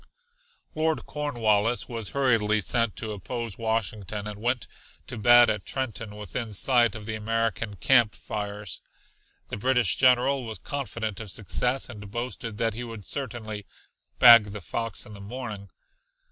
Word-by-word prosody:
Lord 155 0 0
Cornwallis 120 -6 +1
was 115 -4 -4
hurriedly 115 -6 +2
sent 115 +1 +1
to 110 - -4
oppose 115 +2 -5
Washington, 110 -2 -2
and 105 0 -7
went 120 0 0 0.4
to - - -7
bed 120 +2 +7
at 105 -3 -1
Trenton 115 -5 -4
within 105 +2 -5
sight 120 +1 +3
of 110 -1 -8
the 110 - -4
American 115 0 -1
camp 120 -1 +4
fires. 105 -2 -6 0.7
The - - -4
British 125 +2 +2
general 130 +1 +4
was 110 -3 -6
confident 115 - -4
of 110 -3 -7
success 125 +7 0
and 105 -5 -9
boasted 120 0 -5
that 115 0 +1
he 120 +3 -5
would 115 -4 -8
certainly 110 -7 -4 0.5
"bag 115 -4 +8
the 105 - -6
fox 115 +4 -3
in 105 - -11
the 100 - -10
morning." 105 -2 -7
115 Hz, 145 wpm, -26 LUFS, 105-120 Hz, 0.7 s, bag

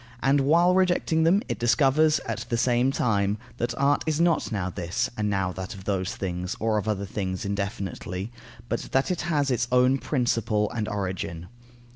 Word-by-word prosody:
And 140 +1 +4
while 170 +6 +4
rejecting 175 -3 +2
them, 190 +5 +4
it - - -3
discovers, 135 +6 +3
at - - -5
the 120 - 0
same 125 +2 +2
time, 105 -5 +1 0.2
that 120 0 -2
art 140 +1 +2
is 155 0 0
not 170 -5 +2
now 100 -4 -1
this 85 0 -2
and 105 -1 -1
now 95 -2 0
that 95 +3 -6
of 95 - -11
those 95 +2 -2
things, 90 -1 -3
or 110 -1 +1
of 105 - -6
other 100 -2 -1
things, 95 -1 -4
indefinitely, 100 0 -4 0.4
but - - -1
that 135 +6 +2
it 180 - -1
has 145 -4 +1
its 120 -1 0
own 125 +2 +4
principle 115 -6 0
and 110 -3 -3
origin. 95 -4 -4
115 Hz, 180 wpm, -26 LUFS, 100-140 Hz, 0.4 s, And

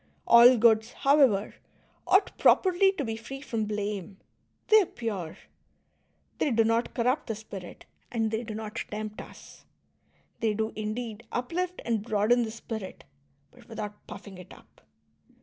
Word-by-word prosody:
All 240 +2 +8
goods, 220 0 +3
however, 270 -8 +3 0.5
ought 385 +2 +3
properly 380 +1 +4
to 290 -8 -3
be 225 -1 -3
free 235 +5 -8
from 230 -5 -3
blame; 205 -2 -4 0.5
they 435 0 +8
are 375 - -2
pure, 195 -9 -5 1.0
they - - +1
do 230 -3 +3
not 230 +1 0
corrupt 250 +4 0
the 225 - -3
spirit, 200 -4 -10 0.3
and 225 -2 -1
they 220 +1 -1
do 220 -2 -6
not 215 -1 -5
tempt 215 0 -5
us. - - -14 0.8
They 220 -2 0
do, 220 +1 -2
indeed, 220 +1 -5
uplift 350 +8 -3
and 230 -3 0
broaden 220 +3 +2
the 230 - -2
spii 225 0 -6
it, 190 - -10 0.5
but 245 -1 -20
without 210 -2 -7
puffing 190 -3 -10
it 180 - -13
up. - - -22
225 Hz, 150 wpm, -28 LUFS, 215-245 Hz, 1.0 s, All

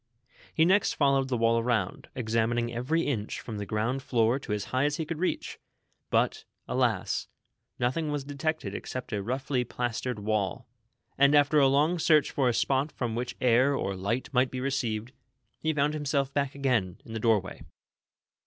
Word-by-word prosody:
lie 160 - +6
next 190 +3 +3
followed 140 -2 +2
the 125 - 0
wall 115 0 +3
around, 115 -5 -1
examining 120 0 0
every 130 +8 0
inch 110 -7 -2
from 110 - -6
the 100 - -5
ground 115 +6 -1
Hoor 120 0 +2
to 120 - -7
as 105 -1 -1
higli 130 +3 +1
as 150 - -2
he 160 - -2
could 155 0 -5
reach; 185 - -2 0.5
but, - - +1 0.2
alas, - - 0 0.5
nothing 150 +6 0
was 145 -1 -2
detected 145 -5 -3
except 125 +2 -6
a 105 - -1
rougnly 130 +3 -1
plastered 125 0 -2
wall; 105 -2 -2 0.5
and 140 +1 +6
after 145 +1 +5
a 140 - +6
long 150 +6 +2
search 155 -2 +4
for 135 -3 +2
a - - +1
spot 135 +5 +1
from 120 -3 -3
wnich 120 +2 -3
air 130 +3 +4
or 100 -6 -2
light 100 +7 -2
might 125 0 +3
be 130 - -5
received, 120 -4 -2 0.5
he 160 - 0
found 150 0 +1
himself 140 -2 -1
back 140 -1 -1
again 120 -10 0
to - - -15
the 110 0 -4
doorway. 105 -4 +1
130 Hz, 175 wpm, -28 LUFS, 115-140 Hz, 0.5 s, lie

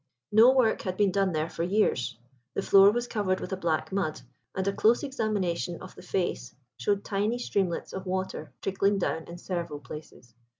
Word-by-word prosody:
No 225 +4 +8
work 255 -4 +3
had 185 -1 -4
been 205 -2 +3
done 195 0 +2
there 155 -1 -1
for 165 - -6
years. 170 - +1 0.4
The 195 - -1
floor 195 0 +7
was 240 +3 -1
covered 195 -5 0
with - - -5
a - - +1
black 170 -3 -1
mud, 185 -6 -1 0.4
and 190 0 -1
a 200 - +2
close 225 +6 +3
examination 200 -10 -1
of 185 - -10
the - - -12
face 175 -9 -2 0.2
showed 200 -1 0
tiny 210 +4 0
streamlets 195 -7 -1
of 190 0 -6
water 190 +1 -3
trickling 195 +1 +1
down 165 -3 -1
in 170 - -8
several 170 -4 -4
places. 145 -5 -11
190 Hz, 185 wpm, -28 LUFS, 170-205 Hz, 0.4 s, No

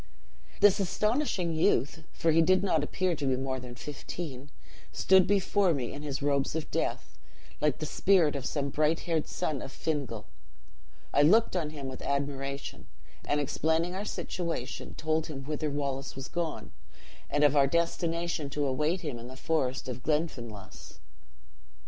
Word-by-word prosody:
"This 205 -1 +6
astonishing 200 - 0
youth 155 0 +1
(for 165 - +1
he 165 +1 +5
did 185 +3 +4
not 160 -6 +2
appear 185 +3 0
to 145 -2 -2
be 130 -1 +2
more 130 0 -2
than 125 -1 -9
fifteen) 145 0 -6 0.4
stood 190 -1 +5
before 200 -3 +3
me 125 -4 -3
in 145 - -7
his 140 -2 -4
robes 140 0 +1
of 160 -2 -3
death, - - -2 0.4
like 150 -3 +2
the 155 - -4
spirit 170 -2 +3
of 140 - -3
some 140 -2 -1
bright 155 +3 +1
haired 165 -3 0
son 145 -4 -2
of 135 - -7
Fingal. 135 -9 -3 0.9
I 145 - +5
looked 210 +8 +5
on 165 -4 0
him 145 -3 -6
with 130 -1 -7
admiration; 140 0 -3 0.4
and 145 - +1
explaining 160 +4 +1
our 190 +2 -3
situation, 170 -10 -4
told 160 0 0
him 135 -4 -6
whither 150 +1 -2
Wallace 140 -1 -3
was 135 +1 -6
gone, 170 -3 -3 0.6
and 145 0 +2
of 145 0 +5
our 140 -1 +6
destination 170 -1 0
to 145 +1 -1
await 150 +7 0
him 145 -7 -4
in 120 - -8
the 130 +1 -10
forest 135 -4 -1
of 125 -1 -5
Glenfinlass. 125 - -3
150 Hz, 160 wpm, -30 LUFS, 135-170 Hz, 0.9 s, This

